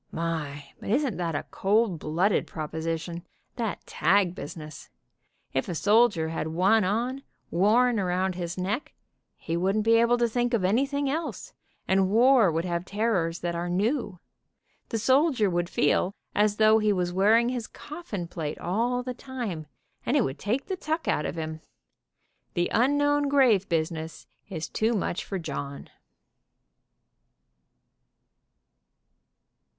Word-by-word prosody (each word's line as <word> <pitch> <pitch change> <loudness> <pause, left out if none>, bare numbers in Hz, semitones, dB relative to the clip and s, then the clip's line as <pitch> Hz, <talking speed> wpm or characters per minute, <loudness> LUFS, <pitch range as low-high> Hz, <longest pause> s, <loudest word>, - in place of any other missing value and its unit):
My, 150 -4 -4
but - - -7
isn't 255 0 +1
that 170 -3 -2
a - - -3
cold 205 -3 +1
blooded 175 +8 +1
proposition, 165 +2 -4 0.3
that 230 -4 -3
tag 185 +1 +2
business. 155 0 -9 0.6
If 135 +7 -1
a 175 - -2
sol 215 +8 +5
dier 160 -8 -3
had 160 -1 -3
one 190 +7 +3
on, 240 +8 -1 0.3
worn 225 +6 +3
around 185 0 0
his 175 0 -5
neck, 200 +9 -3 0.4
he 165 - -4
wouldn't 195 +5 +1
be 230 0 +5
able 235 +1 +4
to 240 0 +2
think 240 +1 0
of 210 - -1
anything 275 +8 +1
else, 290 - -4 0.3
and 190 0 +3
war 235 -2 +5
would 165 +2 -1
have 170 -1 -2
terrors 195 -5 -1
that 175 0 -2
are 170 +1 -3
new. 205 +2 0 0.7
The 225 - -1
soldier 260 - +3
would 175 0 -1
feel 180 +6 +1 0.2
as 210 0 +2
though 220 0 +5
he 215 -1 +2
was 180 -2 -1
wearing 220 +5 +4
his 245 -3 -3
coffin 295 - -7
plate 160 -3 -5
all 235 +7 -1
the 250 0 -4
time, 240 - -5 0.4
and 280 - +1
it 265 - +4
would 135 - -4
take 235 +7 -1
the 380 - -3
tuck 320 -1 -3
out 150 - +1
of - - -5
him. 160 -1 -5 0.9
The 175 0 0
unknown 290 +3 +2
grave 245 -9 +4
business 160 -1 -2 0.2
is 165 -4 -4
too 225 +2 0
much 195 -3 -1
for 195 - -4
John." 140 -5 -6
200 Hz, 145 wpm, -27 LUFS, 170-240 Hz, 0.9 s, sol